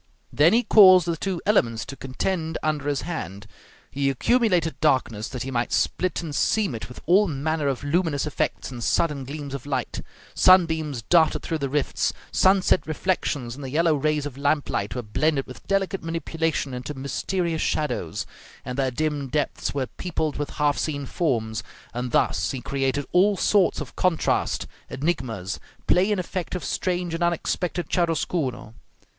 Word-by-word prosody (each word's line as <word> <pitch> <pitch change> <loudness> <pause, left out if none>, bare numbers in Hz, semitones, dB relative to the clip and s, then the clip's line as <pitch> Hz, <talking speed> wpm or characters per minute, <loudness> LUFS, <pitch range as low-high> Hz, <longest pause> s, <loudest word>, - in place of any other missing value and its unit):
Then 160 +6 +5
he 240 +2 +4
caused 185 -7 +8
the 170 - 0
two 180 +1 -3
elements 115 - +2
to 135 - -7
contend 160 +5 -2
under 150 -2 -1
his 140 -3 0
hand; 100 - -5 0.5
he 140 0 0
accumulated 180 - +1
darkness 125 -8 +1
that 125 - -4
he 135 - -5
might 120 -1 -1
split 180 -1 0
and 155 -3 -5
seam 205 - +1
it 115 - -6
with 125 - -10
all 195 +5 +5
manner 155 0 -1
of 135 -3 -1
luminous 155 -1 0
effects 150 - -2
and 120 -2 -6
sudden 145 -2 +1
gleams 140 0 -6
of 140 0 -6
light; 130 -4 -2 0.3
sunbeams 160 -8 +4
darted 160 +3 +3
through 160 - -2
the 140 -2 -2
rifts, 145 +1 0 0.2
sunset 190 -2 +3
reflections 150 -7 -1
and 140 +3 -9
the 135 - -5
yellow 165 +3 +3
rays 150 0 0
of 140 -2 -7
lamp 145 +1 +1
light 100 +4 -2
were 125 - -3
blended 135 +6 0
with 125 - -12
delicate 195 0 0
manipulation 165 -3 -2
into 125 +4 -5
mysterious 160 +5 -2
shadows, 150 -1 -1 0.4
and 125 +2 -4
their 135 -1 +2
dim 145 +1 -2
depths 145 +1 -2
were 135 -2 0
peopled 155 0 -3
with 145 0 -3
half 145 -1 +2
seen 145 -3 -2
forms; 115 -8 -1 0.3
and 125 +1 -3
thus 85 -7 +1
he 135 - -3
created 135 +2 -1
all 195 +3 +4
sorts 195 -2 +3
of 145 -4 -7
contrasts, 180 -3 +1 0.2
enigmas, 125 - -2 0.3
play 185 +3 +3
and 205 - +1
effect 185 0 -4
of 180 - -4
strange 180 -2 -1
and 165 - -3
unexpected 175 +1 -1
chiaroscuro. 160 -9 -1
150 Hz, 165 wpm, -24 LUFS, 135-175 Hz, 0.5 s, caused